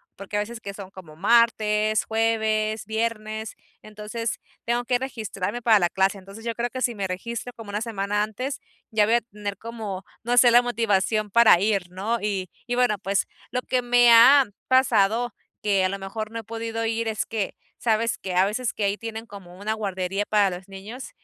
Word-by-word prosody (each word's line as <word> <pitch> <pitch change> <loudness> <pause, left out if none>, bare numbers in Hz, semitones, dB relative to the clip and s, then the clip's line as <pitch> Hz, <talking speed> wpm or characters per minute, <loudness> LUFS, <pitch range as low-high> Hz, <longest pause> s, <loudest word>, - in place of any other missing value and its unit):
porque 200 +1 -5
a - - +2
veces 230 +2 -6
que 200 - -6
son 195 -2 -9
como 175 -6 -12
martes, 215 +1 +3
jueves, 220 -1 0
viernes, 220 0 -3 0.3
entonces 215 +2 -5 0.3
tengo 240 +1 0
que 245 0 +1
registrarme 235 -4 -4
para 225 -3 +6
la 175 -2 +2
clase. 195 +2 +1
Entonces 195 +4 -12
yo 230 - -1
creo 240 +1 -1
que 255 +1 -6
si 240 -1 +1
me 200 -2 -2
registro 235 +6 -5
como 225 -4 -11
una 210 +1 -3
semana 205 -2 -1
antes 255 +6 -4 0.3
ya 215 -2 +4
voy 225 +3 +3
a 240 - +3
tener 205 -3 -6
como, 215 -4 -6 0.2
no 245 +1 0
sé, 245 -1 +7
la 240 +1 +7
motivación 215 -2 +1
para 235 -6 +7
ir, 200 -3 0
¿no? 205 +6 -2
Y 195 -3 -2 0.2
y 245 - -1
bueno, 245 -4 +2
pues 195 0 0 0.3
lo 250 - -1
que 255 -1 0
me 245 0 +5
ha 260 +4 +8 0.2
pasado 240 -3 +3 0.3
que 200 -2 +2
a 185 - +2
lo 195 - -3
mejor 215 +3 -5
no 230 - -4
he 225 - -8
podido 225 +1 -4
ir 225 0 -1
es 220 -1 -1
que 215 -3 -3 0.2
sabes 230 0 +1
que 190 - -5
a 185 +1 +5
veces 220 +4 -2
que 215 - -3
ahí 200 +1 0
tienen 225 0 -6
como 190 -4 -12
una 215 +2 -1
guardería 195 -2 -2
para 200 -4 +2
los 185 +2 -11
niños 200 +7 -9
215 Hz, 200 wpm, -24 LUFS, 200-230 Hz, 0.3 s, ha